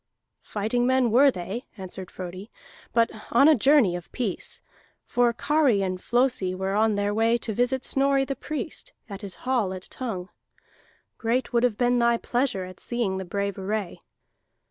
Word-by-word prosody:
"Fighting 220 +4 -1
men 260 -3 +3
were 270 +5 +6
they," 200 +3 -5
answered 185 -1 -8
Frodi, 185 +3 -8 0.4
"but 230 -1 +3 0.2
on 275 +5 +5
a 315 - +8
journey 265 -7 +4
of 175 -1 -8
peace. 220 -8 -3 0.5
For 245 -1 +2
Kari 270 -4 +2
and 185 -1 -3
Flosi 240 -7 +1
were 190 +1 -2
on 215 +1 +3
their 205 0 0
way 225 +2 +3
to 225 -1 -3
visit 245 +4 0
Snorri 275 0 +2
the 275 - -3
Priest 310 - -5
at 200 -2 -8
his 200 -3 -6
hall 235 -8 +1
at 185 - -8
Tongue. 200 -8 -5 0.9
Great 245 +3 0
would 235 - +3
have 240 -4 +1
been 245 0 +2
thy 235 0 +3
pleasure 245 -5 -1
at 185 0 -11
seeing 225 -6 -1
the 190 - -5
brave 200 +2 -3
array." 200 -1 -3
230 Hz, 165 wpm, -26 LUFS, 195-250 Hz, 0.9 s, a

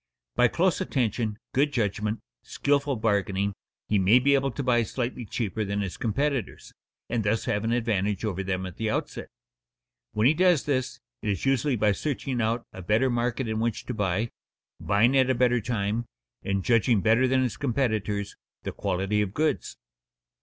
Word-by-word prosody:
By - - +5
close - - +1
attention, 110 -3 -1 0.2
good 145 +2 +2
judgment, 105 -2 -1 0.2
skilful 140 -1 0
bargaining, 100 -3 0 0.3
he 105 - +2
may 95 +6 +6
be 140 +3 +3
able 135 0 +2
to 135 +3 -4
buy 120 -2 +3
slightly 120 +1 -3
cheaper 110 -1 -2
than 100 0 -2
his 95 -3 -4
competitors, 135 +2 -2 0.3
and 115 -2 -1
thus 105 +2 0
have 105 +1 0
an 115 - 0
advantage 105 -4 0
over 95 -3 -2
them 95 -1 -2
at 90 - -8
the 110 -1 -1
outset. - - -3 0.9
When 105 +1 +1
he 140 - +6
does 175 -2 +3
this, 130 -3 -1 0.2
it 105 - -2
is 100 +3 -1
usually 135 0 +2
by 105 -2 +3
searching 130 +1 -2
out 115 +2 0
a 95 - -8
better 110 +8 +2
market 120 +1 -1
in 110 0 -1
which 115 -1 -1
to 125 - -4
buy, 105 +1 -1 0.5
buying 110 +6 +3
at 130 -1 +4
a 130 - +3
better 125 -1 +3
time, 110 +1 -1 0.4
and 100 -1 -2
judging 115 -2 +3
better 115 +5 +4
than 130 0 +2
his 125 - -1
competitors 110 -6 -1 0.3
the - - -3
quality 95 +3 -1
of 100 -1 -3
goods. 155 +1 -1
115 Hz, 175 wpm, -27 LUFS, 105-130 Hz, 0.9 s, may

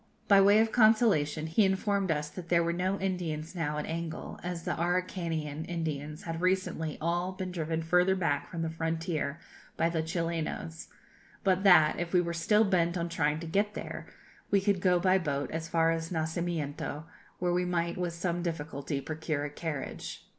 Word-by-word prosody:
By 200 -1 +7
way 200 +2 +6
of 220 0 +3
consolation, 215 -10 +4
he 165 +7 +3
informed 195 0 +1
us 150 -1 0
that 175 -1 -8
there 170 -1 +4
were 170 0 0
no 185 +3 -1
Indians 175 -4 -3
now 150 -4 -2
at 150 - -2
Angol, 165 0 -5
as 175 -1 -4
the - - -1
Araucanian 170 -3 -1
Indians 155 -3 -4
had 165 0 -4
recently 185 -4 0
all 175 +3 -1
been 185 -1 -5
driven 165 -2 -2
further 180 +3 +3
back 145 -6 -1
from 170 -2 -3
the 165 - -1
frontier 165 -2 -2 0.4
by 165 - +2
the 165 -1 0
Chilenos, 165 0 -3 0.6
but 190 -1 +2
that, 175 -6 +6
if 175 +1 -3
we 180 - +6
were 170 -1 -1
still 210 +6 +3
bent 180 -3 +2
on 170 0 -2
trying 150 -2 0
to - - -5
get 200 +5 0
there, - - -6 0.4
we 200 - +4
could 195 -1 +1
go 180 -1 +4
by 185 +1 +4
boat 140 -5 -2
as 160 0 -3
far 165 -1 +3
as 165 0 -2
Nacimiento, 160 -3 -2 0.3
where 175 -1 0
we 180 +1 +2
might, 170 -1 -1
with 180 -2 -2
some 170 0 -2
difficulty, 145 -4 -3
procure 155 -1 -3
a 145 - -5
carriage. 150 -2 -5
170 Hz, 180 wpm, -30 LUFS, 160-185 Hz, 0.6 s, By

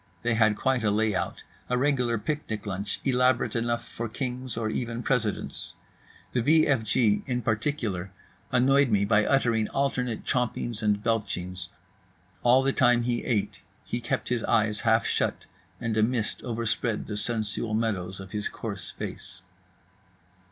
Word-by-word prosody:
They 120 0 +2
had 110 -2 +3
quite 130 -3 +1
a 105 - +3
layout, 105 -1 0 0.3
a 125 - +2
regular 125 -3 +2
picnic 110 -3 -3
lunch 100 0 -3
elaborate 125 -2 +2
enough 120 0 -1
for 115 0 -5
kings 125 0 -4
or 115 -1 -1
even 115 +2 -3
presidents. 120 -6 -1 0.6
The 120 - +1
v 155 +6 +5
f 135 -5 +2
g 110 0 +2
in 125 -2 -1
particular 110 -5 -1 0.4
annoyed 135 +2 +4
me 100 -2 +3
by 105 0 +4
uttering 115 -5 +2
alternate 125 -4 -1
chompings 120 -2 -1
and 105 -1 +1
belchings. 90 -6 -1 0.7
All 125 +2 +5
the 135 0 +2
time 120 -1 +4
he 120 0 -1
ate 110 -5 -1 0.2
he 120 - -3
kept 115 - -2
his 120 -2 0
eyes 105 -1 +2
half 110 0 +3
shut; - - 0 0.3
and 115 -2 -2
a 110 - +3
mist 115 0 0
overspread 115 -1 -1
the 105 - -5
sensual 110 0 -1
meadows 95 -5 -1
of 95 0 -9
his 105 -1 -2
coarse 100 -5 -6
face. - - -7
115 Hz, 150 wpm, -27 LUFS, 105-125 Hz, 0.7 s, v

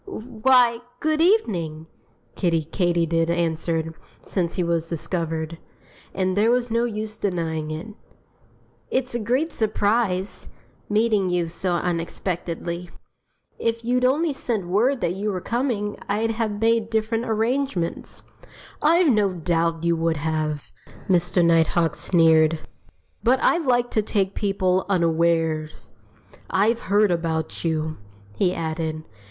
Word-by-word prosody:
"Why, 245 - +2 0.2
good 310 0 +1
evening!" 180 - +1 0.5
Kiddie 165 -4 +1
Katydid 165 -1 +1
answered, 165 -1 -1 0.3
since 175 -3 -2
he 180 - 0
was 165 -1 -1
discovered 165 -1 -3 0.5
and 185 -1 -1
there 210 +3 +3
was 245 -1 +1
no 230 +1 +2
use 215 -1 -5
denying 165 -5 -2
it. 155 +7 -5 1.0
"It's 260 -1 -1
a 240 - -1
great 255 +9 0
surprise 205 -4 0 0.4
meeting 210 -3 +2
you 175 -1 0
so 175 +2 -2
unexpectedly. 170 0 -3 0.7
If 230 0 -1
you'd 250 +1 +1
only 295 +5 +2
sent 225 -7 -2
word 235 +9 +1
that 170 - 0
you 205 +3 -2
were 185 - -2
coming 230 -2 -2
I'd 220 +3 +1
have 220 -2 -2
made 225 0 +2
different 225 +1 0
arrangements." 225 -4 -2 0.6
"I've 325 -1 +4
no 205 -3 +2
doubt 165 -1 -1
you 170 0 +2
would 165 -1 0
have!" 155 -1 -2 0.4
Mr. 175 -1 +3
Nighthawk 165 -1 +3
sneered. 160 -2 +4 0.7
"But 250 +3 +4
I 345 - +4
like 245 -5 +1
to 215 - +2
take 200 -2 -1
people 190 -2 +1
unawares.... 165 -3 0 0.6
I've 220 +4 +2
heard 205 0 +4
about 160 -2 -2
you," 160 -1 -1 0.4
he 185 -2 +2
added. 160 -2 -3
185 Hz, 125 wpm, -23 LUFS, 165-225 Hz, 1.0 s, I've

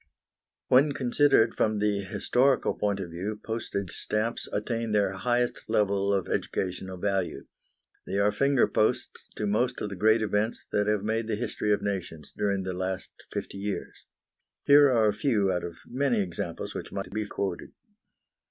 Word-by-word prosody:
When 140 +3 +5
considered 125 -3 +3
from 110 -1 +1
the 105 -1 +1
historical 125 +7 +1
point 100 -1 -1
of 90 -3 -5
view, 100 +5 -4
postage 105 -4 -3
stamps 110 +2 -2
attain 115 +1 -2
their 100 -2 +3
highest 120 +5 -1
level 100 -2 +2
of 95 -2 0
educational 95 0 -3
value. 95 -1 -1 0.6
They 100 - -2
are 100 +1 +3
finger 140 +2 +3
posts 110 - 0
to 105 - -2
most 110 +5 +1
of 105 - -3
the - - -4
great 110 +4 +3
events 105 +2 -1
that 105 0 +1
have 105 -2 +1
made 110 +1 -1
the 110 - 0
history 105 -1 -2
of 105 - +1
nations 90 -6 -4
during 100 -2 0
the 95 0 -3
last 95 +1 -3 0.2
fifty 100 - -5
years. 100 0 -5 0.6
Here 145 0 +7
are 115 -4 +4
a 105 - +2
few 105 -5 +1
out 90 - -1
of 85 -1 -6
many 130 -2 0
examples 90 -4 -3
which - - -6
might 95 -2 -5
be 105 +1 -2
quoted. 95 -3 -4
105 Hz, 165 wpm, -28 LUFS, 95-115 Hz, 0.6 s, Here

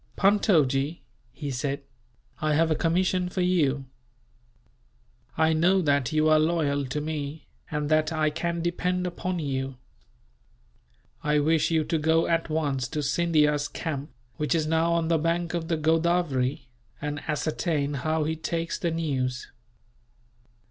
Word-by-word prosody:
"Puntojee," 160 - +2 0.3
he 145 +2 -5
said, 140 +2 -2 0.6
"I 155 -1 +2
have 160 +1 +3
a - - +3
commission 180 +3 +1
for 185 - -2
you. 150 -7 +1 1.5
I 160 0 +3
know 175 +5 +3
that 140 -4 +1
you 155 0 +2
are 155 0 +5
loyal 150 -4 +1
to 135 +4 -2
me, 150 0 -4 0.2
and 150 -1 -2
that 155 0 +3
I 155 -1 +1
can 170 +2 -2
depend 180 +1 -1
upon 180 +1 -3
you. 135 -4 -3 1.5
I 150 0 +2
wish 155 +1 +2
you 160 -2 +2
to 160 +1 -1
go 160 +2 +3
at 165 0 0
once 145 -5 -1
to 150 +2 -3
Scindia's 150 -1 +2
camp, 145 -2 -4 0.3
which 150 +3 0
is 160 -2 +1
now 160 +2 +2
on 165 -1 +1
the 165 -1 +2
bank 170 +1 0
of 170 -2 -2
the 165 - 0
Godavery, 155 -5 +1 0.3
and 145 0 -3
ascertain 150 -1 -1
how 155 +3 0
he 160 +1 -1
takes 165 +1 -3
the 170 - 0
news. 135 -6 -2
155 Hz, 145 wpm, -26 LUFS, 145-165 Hz, 1.5 s, are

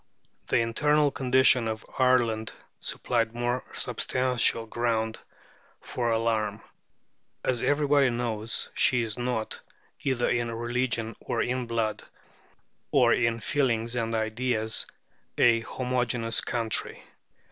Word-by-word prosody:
The - - +2
internal 145 +6 +2
condition 130 -2 +3
of 110 0 -4
Ireland 120 -4 +2 0.3
supplied 115 -2 -1
more 120 +1 -1
substantial 125 -3 +1
grounds 110 -1 -1 0.6
for 120 -1 -3
alarm. 115 -1 0 0.8
As 125 -2 0
everybody 145 -2 +3
knows, 115 -2 -2
she 125 -2 +2
is 110 +1 -3
not, 120 -3 -2 0.4
either 130 -3 +1
in 120 -1 0
religion 120 -1 -1
or - - -1
in 125 0 -2
blood, 115 -2 -1 0.9
or - - +4
in 115 0 +1
feelings 120 -5 0
and 115 -1 -1
ideas, 110 0 -1 0.5
a 115 -1 +5
homogeneous 120 -1 -1
country. 115 -2 -2
120 Hz, 105 wpm, -27 LUFS, 115-125 Hz, 0.9 s, a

